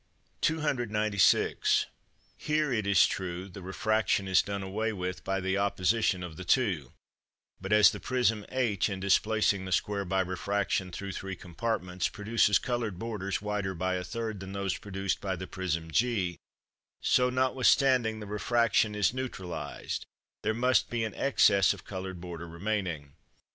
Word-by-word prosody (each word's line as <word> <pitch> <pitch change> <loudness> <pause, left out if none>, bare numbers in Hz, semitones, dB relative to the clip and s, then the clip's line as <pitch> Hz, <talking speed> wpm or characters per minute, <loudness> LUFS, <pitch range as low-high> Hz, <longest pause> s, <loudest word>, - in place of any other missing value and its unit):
296. 110 -10 +2 0.5
Here, 150 -2 0
it 110 -4 -1
is 100 -2 +6
true, 90 0 -4
the 95 +1 -10
refraction 100 +2 0
is 95 -1 +5
done 100 -1 -4
away 110 +4 -2
with 90 -2 -4
by 95 0 -1
the 95 +1 0
opposition 100 -1 +1
of 80 -3 -8
the 95 - -6
two; 90 - +1 0.7
but 95 +1 -5
as 105 0 +7
the - - -7
prism 120 -4 +1
h, 115 -7 0
in 95 -2 -4
displacing 100 0 +2
the 95 - -6
square 100 +3 0
by 95 +1 +1
refraction 95 0 -1
through 100 +3 -5
three 95 +1 -5
compartments, 90 0 -2
produces 105 -1 +2
coloured 120 -6 -2
borders 100 -2 -3
wider 105 -2 -2
by 95 +2 -1
a 90 0 -2
third 110 0 -4
than 95 0 -8
those 100 -2 -1
produced 95 -1 -3
by 95 -2 -2
the 95 +1 -6
prism 85 -4 -3
g, 100 -5 0 0.6
so, 125 0 +3
notwithstanding 130 -2 +3
the 105 - -7
refraction 110 0 +1
is 105 +2 +2
neutralised, 90 - -5 0.3
there 110 - 0
must 125 +2 +2
be 120 -1 -1
an 110 -3 -3
excess 100 -7 +4
of 95 - -15
coloured 95 -2 -6
border 85 -1 -7
remaining. 85 -5 -3
100 Hz, 155 wpm, -29 LUFS, 95-110 Hz, 0.7 s, as